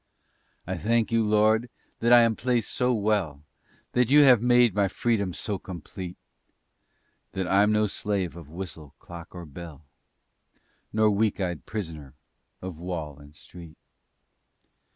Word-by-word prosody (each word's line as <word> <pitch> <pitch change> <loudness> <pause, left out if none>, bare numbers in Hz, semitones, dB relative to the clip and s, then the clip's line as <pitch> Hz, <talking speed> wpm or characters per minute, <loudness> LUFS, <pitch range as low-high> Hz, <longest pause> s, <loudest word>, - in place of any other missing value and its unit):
I 95 +1 -3
thank 115 +5 +1
You, 115 -1 +3
Lord, 110 +2 +3 0.3
that 120 +1 +2
I 120 0 +9
am 115 -1 +3
placed 120 -3 -1
so 125 0 +1
well, 100 - 0 0.5
That 125 -1 +2
You 145 +2 +7
have 130 -6 +6
made 120 -2 +4
my 100 -1 +2
freedom 100 -1 -1
so 100 +2 -4
complete; 90 +1 -8 1.2
That 95 -1 -2
I'm 100 +3 +4
no 105 0 +3
slave 100 -4 -2
of 85 -4 -11
whistle, 80 -4 -8
clock 85 0 -11
or 90 -1 -7
bell, 80 0 -11 1.1
Nor 110 0 +3
weak 105 +1 +1
eyed 90 -4 -3
prisoner 80 - -6 0.5
of 90 -4 -7
wall 80 -5 -5
and 75 +1 -16
street. 85 -1 -12
100 Hz, 140 wpm, -26 LUFS, 85-110 Hz, 1.2 s, I